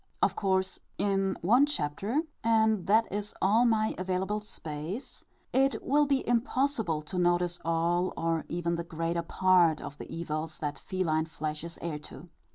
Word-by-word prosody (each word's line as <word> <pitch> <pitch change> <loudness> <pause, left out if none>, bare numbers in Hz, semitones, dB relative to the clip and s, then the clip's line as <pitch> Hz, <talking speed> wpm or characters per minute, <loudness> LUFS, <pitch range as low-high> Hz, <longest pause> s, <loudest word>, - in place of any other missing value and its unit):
Of - - +2
course, 190 -1 0 0.2
in 195 -1 +1
one 245 +10 +5
chapter 205 - -1 0.2
and 220 -4 +3
that 220 +3 +5
is 205 +1 -4
all 220 +5 +4
my 220 -2 +2
available 190 +3 -1
space 165 - -7 0.3
it 270 +1 +3
will 290 +2 +3
be 275 -2 +1
impossible 235 - +1
to 180 +4 -4
notice 175 0 +2
all, 170 +2 +1
or 165 -1 0
even 170 0 -1
the 170 - -3
greater 165 +1 -2
part, 175 -2 +3
of 140 - -8
the - - -8
evils 160 -1 -4
that 145 -2 -4
feline 165 -5 0
flesh 155 -1 -5
is 170 0 -7
heir 160 -3 -3
to. 150 +3 -11
180 Hz, 160 wpm, -29 LUFS, 165-215 Hz, 0.3 s, one